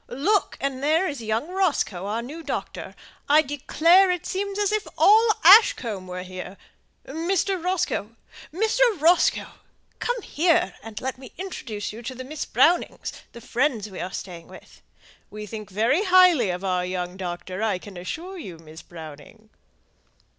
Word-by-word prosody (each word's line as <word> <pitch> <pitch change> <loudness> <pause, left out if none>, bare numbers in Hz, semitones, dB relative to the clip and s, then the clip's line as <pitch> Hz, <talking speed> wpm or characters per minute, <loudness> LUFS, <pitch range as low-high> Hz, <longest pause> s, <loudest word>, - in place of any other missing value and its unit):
Look! 360 - 0
and 270 -1 -3
there 320 +6 +2
is 285 -6 -5
young 225 +7 -2
Roscoe, 310 - -1
our 225 +3 -2
new 300 +7 -8
doctor. - - -5 0.3
I 305 +2 +6
declare 325 +6 +3
it 360 -2 -1
seems 395 +1 -3
as 415 -1 +1
if 430 0 -1
all 440 +3 +6
Ashcombe 250 - +6
were 180 0 -6
here. 185 +1 -8 0.5
Mr. 345 +4 -1
Roscoe! 345 - -2 0.4
Mr. 435 +8 -1 0.2
Roscoe! 335 +3 +2 0.4
come 485 0 -1
here 320 - +1
and 225 -1 -8
let 260 0 -4
me 260 -2 -12
introduce 250 - -6
you 225 - -9
to 250 +2 -6
Miss 295 +3 -5
Browning, 345 +3 +2 0.4
the 235 - -11
friend 240 -3 -1
we 185 - -8
are 185 - -4
staying 175 -4 -8
with. - - -15 0.5
We 210 0 -8
think 215 -1 -8
very 230 - +1
highly 360 - +5
of 180 +1 -4
our 180 -2 0
young 180 0 -4
doctor, 185 +1 -6
I 220 -4 0
can 195 +1 -12
assure 335 - -6
you, 185 - -8
Miss 160 0 -13
Browning." 165 +7 -13
255 Hz, 155 wpm, -24 LUFS, -, 0.5 s, I